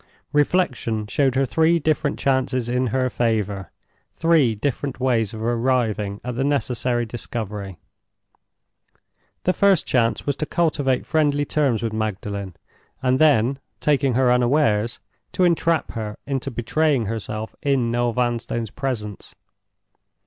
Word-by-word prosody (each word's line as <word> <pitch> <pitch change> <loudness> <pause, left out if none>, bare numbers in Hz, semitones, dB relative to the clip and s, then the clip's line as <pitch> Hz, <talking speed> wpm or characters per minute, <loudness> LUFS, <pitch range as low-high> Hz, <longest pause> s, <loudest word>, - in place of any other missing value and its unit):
Reflection 140 -8 +1
showed 135 +4 +1
her 135 +1 +3
three 160 +5 +3
different 155 -1 0
chances 130 -2 0
in 125 +1 0
her 130 +2 +1
favor—three 115 - -1
different 140 +4 -3
ways 120 -5 +1
of 110 -1 -6
arriving 115 -4 0
at 125 - -4
the 135 - 0
necessary 125 -4 0
discovery. 105 -5 -5 1.7
The 185 - +2
first 195 -4 +3
chance 115 -4 +1
was 145 - 0
to 155 - -2
cultivate 145 -6 0
friendly 145 -2 +1
terms 135 -7 +1
with 115 -2 -2
Magdalen, 100 -3 -3 0.5
and 130 0 +2
then, 135 -3 +4 0.2
taking 140 -4 +2
her 125 -1 +4
unawares, 120 -3 +2 0.3
to 185 - +1
entrap 170 -1 +2
her 105 -2 -5
into 135 -1 -2
betraying 135 +2 +1
herself 110 0 -4
in 135 -5 +1
Noel 120 0 +1
Vanstone's 120 -2 -1
presence. 115 -6 -5
125 Hz, 125 wpm, -22 LUFS, 110-140 Hz, 1.7 s, then